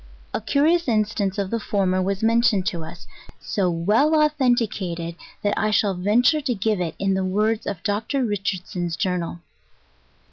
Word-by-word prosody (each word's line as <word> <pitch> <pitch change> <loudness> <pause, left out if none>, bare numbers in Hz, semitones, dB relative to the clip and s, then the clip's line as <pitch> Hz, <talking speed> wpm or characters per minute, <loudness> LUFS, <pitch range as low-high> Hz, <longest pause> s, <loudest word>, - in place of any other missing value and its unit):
A - - -2
curious 300 +9 +2
instance 210 -3 0
of 195 -2 -2
the 230 - 0
former 190 -3 0
was 195 +2 -2
mentioned 225 -4 +3
to 170 -3 -2
us, 160 - -10 0.3
so 185 -3 -1
ivell 210 - +2
authenticated, 215 - -1 0.3
that 205 0 +1
I 215 - +1
shall 205 -2 +2
venture 220 - +2
to 260 -4 -1
give 210 -1 0
it 170 -2 -3
in 195 0 0
the 190 0 0
words 210 +4 0
of 185 -3 -4
Dr. 220 +6 -1
Richardson's 185 -4 -3
Journal. 170 +1 -2
205 Hz, 155 wpm, -23 LUFS, 185-225 Hz, 0.3 s, mentioned